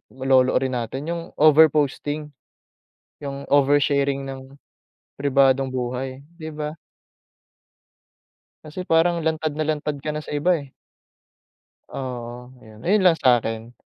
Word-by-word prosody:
lolo 130 Hz, -1 st, +3 dB
rin 130 Hz, 0 st, +1 dB
natin 135 Hz, +7 st, -5 dB
yung 170 Hz, 0 st, -3 dB
over 155 Hz, +1 st, +7 dB
posting, 150 Hz, 0 st, -2 dB, 0.9 s
yung 140 Hz, -1 st, -6 dB
oversharing 140 Hz, -1 st, +2 dB
ng 135 Hz, 0 st, -9 dB, 0.6 s
pribadong 135 Hz, -1 st, +3 dB
buhay, 130 Hz, +1 st, -4 dB, 0.2 s
di 155 Hz, -, -7 dB
ba? 150 Hz, 0 st, -4 dB, 1.9 s
Kasi 155 Hz, +4 st, -6 dB
parang 170 Hz, 0 st, +2 dB
lantad 160 Hz, -1 st, -1 dB
na 155 Hz, -, -2 dB
lantad 150 Hz, -1 st, -2 dB
ka 155 Hz, -, -3 dB
na 150 Hz, -, -3 dB
sa 150 Hz, -, -7 dB
iba, 170 Hz, +4 st, +2 dB
eh. 140 Hz, -2 st, -11 dB, 1.2 s
Oo, 125 Hz, -1 st, -7 dB
yun. 110 Hz, -1 st, -15 dB
Ayun 205 Hz, +4 st, +3 dB
lang 180 Hz, -3 st, +5 dB
sa'kin. 115 Hz, -4 st, +1 dB
140 Hz, 120 wpm, -23 LUFS, 130-155 Hz, 1.9 s, over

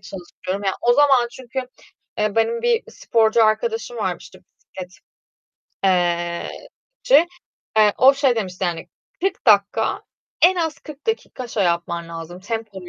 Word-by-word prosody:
çalışıyorum. 195 Hz, +1 st, -7 dB
Ya, 195 Hz, -, +1 dB
o 240 Hz, -, +4 dB
zaman 265 Hz, -3 st, +4 dB
çünkü, 260 Hz, 0 st, -5 dB, 0.6 s
eee, 210 Hz, 0 st, 0 dB
benim 465 Hz, -, +1 dB
bir 475 Hz, -1 st, +2 dB
sporcu 225 Hz, 0 st, +2 dB
arkadaşım 455 Hz, -, -1 dB
var, -, -, -1 dB
işte -, -, -14 dB
bisiklet 180 Hz, -1 st, -13 dB, 0.9 s
eee, 175 Hz, -2 st, +1 dB, 0.5 s
çi. -, -, +5 dB, 0.5 s
Eee, 210 Hz, -1 st, +5 dB
o 270 Hz, +2 st, +7 dB
şey 270 Hz, -4 st, +2 dB
demişti, 190 Hz, -3 st, -3 dB
yani, 170 Hz, -2 st, -3 dB, 0.3 s
"40 385 Hz, -4 st, -2 dB
dakika, 220 Hz, -, +3 dB, 0.4 s
en 365 Hz, +2 st, +7 dB
az 320 Hz, -3 st, -2 dB
40 300 Hz, -1 st, -12 dB
dakika 440 Hz, -, -3 dB
şey 210 Hz, -4 st, 0 dB
yapman 170 Hz, -1 st, -1 dB
lazım, 165 Hz, +2 st, -8 dB
tempolu 205 Hz, -3 st, -6 dB
220 Hz, 140 wpm, -21 LUFS, 185-280 Hz, 0.9 s, o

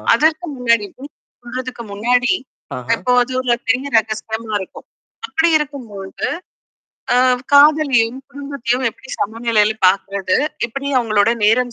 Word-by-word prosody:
அதற்கு 315 Hz, +6 st, +1 dB
முன்னாடி. 235 Hz, -4 st, +2 dB, 0.6 s
சொல்றதுக்கு 255 Hz, -1 st, -6 dB
முன்னாடி 245 Hz, -, +2 dB, 0.6 s
எப்போ 250 Hz, -, -2 dB
வது 245 Hz, +1 st, +2 dB
ஒரு 245 Hz, -2 st, +1 dB
தங்க 260 Hz, +4 st, +1 dB
ரகசியமா 220 Hz, 0 st, -1 dB
இருக்கும். 190 Hz, -, -9 dB, 0.4 s
அப்படி 325 Hz, +1 st, +2 dB
இருக்கும்போது. 245 Hz, -11 st, -4 dB, 0.9 s
அ -, -, +4 dB, 0.4 s
காதலையும், 285 Hz, -5 st, +5 dB
குடும்பத்தையும் 275 Hz, -3 st, -3 dB
எப்படி 265 Hz, +4 st, -13 dB
சமநிலையில 220 Hz, 0 st, +1 dB
பார்கறது, 195 Hz, 0 st, +2 dB, 0.3 s
எப்படி 275 Hz, +4 st, -6 dB
அவங்களோட 215 Hz, -2 st, +2 dB
நேரம் 245 Hz, +3 st, +3 dB
240 Hz, 110 wpm, -18 LUFS, 215-265 Hz, 0.9 s, காதலையும்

